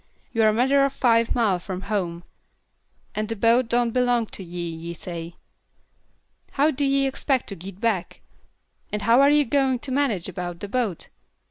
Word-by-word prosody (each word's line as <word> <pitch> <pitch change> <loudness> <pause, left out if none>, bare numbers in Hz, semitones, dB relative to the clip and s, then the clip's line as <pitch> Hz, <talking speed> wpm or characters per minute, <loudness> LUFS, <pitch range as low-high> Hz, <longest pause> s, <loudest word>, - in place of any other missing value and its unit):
You're 225 -1 +3
a - - +2
matter 265 +5 +3
o' 275 - +3
five 230 -4 +2
mile 210 -7 +2
from 185 +1 -6
home, 175 -5 -3 0.9
and 215 0 -3
the 225 - -2
boat 230 +3 +3
don't 240 0 +2
belong 245 -1 +2
to 195 - -6
ye, 175 0 -5
ye 165 +1 -6
say. 170 0 -7 1.2
How 290 +3 +3
do 285 0 -2
ye 275 0 +2
expect 270 -1 0
to 200 - -5
git 185 +2 -10
back? 215 -6 -1 0.7
And 210 0 -3
how 235 +3 +5
are 280 - +6
ye 295 0 +5
going 265 0 +1
to 260 +2 -8
manage 255 -10 0
about 175 -2 -5
the 205 - -5
boat? 215 -5 -2
230 Hz, 175 wpm, -24 LUFS, 185-260 Hz, 1.2 s, are